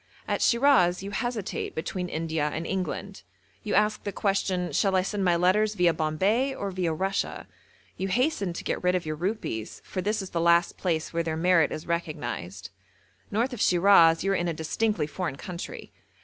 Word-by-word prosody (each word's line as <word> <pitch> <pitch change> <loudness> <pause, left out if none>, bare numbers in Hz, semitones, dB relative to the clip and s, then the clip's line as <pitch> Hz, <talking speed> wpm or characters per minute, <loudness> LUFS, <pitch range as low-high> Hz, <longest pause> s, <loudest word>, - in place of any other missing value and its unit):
At - - -1
Shiraz 235 -9 +4
you 200 - -5
hesitate 235 -2 -3
between 180 +3 -3
India 160 -2 -1
and 160 +2 -4
England. 190 +1 -4 0.4
You - - -2
ask 210 +1 +2
the 205 - -3
question, 190 -2 0
'Shall 195 -2 +2
I 185 - +3
send 200 +1 -2
my 175 -2 +3
letters 205 +5 +2
viâ 175 -3 +3
Bombay, 200 - +1
or 200 -1 -4
viâ 175 -4 -2
Russia?' 195 +1 -2 0.5
You 190 - -2
hasten 245 - 0
to - - -6
get - - -3
rid 180 0 +3
of 180 - -1
your 155 0 -3
rupees, 170 - -3
for 185 - -4
this 210 +2 -1
is 190 - -9
the 170 - -1
last 170 +1 +3
place 165 -3 -2
where 170 - +1
their 160 -1 -2
merit 170 -1 +3
is 155 - -5
recognised. 120 - -4 0.6
North 235 +5 0
of 240 - -5
Shiraz 170 -3 +5
you 195 - +1
are - - +2
in 175 -1 0
a 165 - -2
distinctly 165 +2 -1
foreign 160 -1 -4
country. 175 +3 -7
180 Hz, 190 wpm, -27 LUFS, 165-200 Hz, 0.6 s, Shiraz